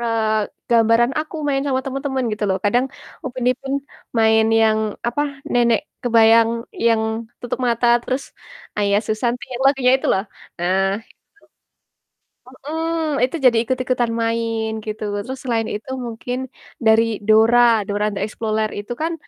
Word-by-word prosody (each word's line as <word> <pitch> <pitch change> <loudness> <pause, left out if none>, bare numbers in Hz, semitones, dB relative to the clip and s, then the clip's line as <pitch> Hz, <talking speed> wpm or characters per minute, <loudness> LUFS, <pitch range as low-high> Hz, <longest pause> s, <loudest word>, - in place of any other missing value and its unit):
eee, 220 -2 0 0.2
gambaran 230 +2 +4
aku 310 +1 -7
main 275 -1 +1
sama 260 -2 +1
temen-temen 270 -1 -2
gitu 210 0 -2
loh. 190 - +1
Kadang 240 +5 +3 0.4
Upin 255 -1 -4
Ipin 270 +2 -4 0.5
main 220 0 +4 0.2
yang, 220 -1 +3 0.3
apa, 290 +5 -1 0.3
nenek 235 -2 +3 0.2
kebayang 230 -1 +5 0.4
yang 225 -1 +3 0.4
tutup 245 - -4
mata, 235 +1 +1 0.2
terus, 260 +2 -2 0.6
"Ayah 200 -1 +2
susanti" 235 +3 -1
yang 245 - -3
lagunya 270 -2 +4
itu 265 - -5
loh. 190 - +1 0.4
Nah 185 +2 +1 0.2
itu - - -24 1.3
Mhm, 315 +3 -3
itu 265 - -6
jadi 240 -2 +5
ikut-ikutan 250 -1 -1
main 230 -1 -1 0.2
gitu. 215 0 -5 0.2
Terus 260 +1 -5
selain 230 -3 0
itu 210 +4 -7 0.2
mungkin, 235 +2 -5 0.5
dari 220 +1 +6 0.2
Dora, 220 +2 +5 0.3
"Dora 205 +1 0
the 195 - -4
Explorer" 215 0 -2
itu 205 +3 -6
kan 330 - 0
235 Hz, 140 wpm, -20 LUFS, 220-255 Hz, 1.3 s, dari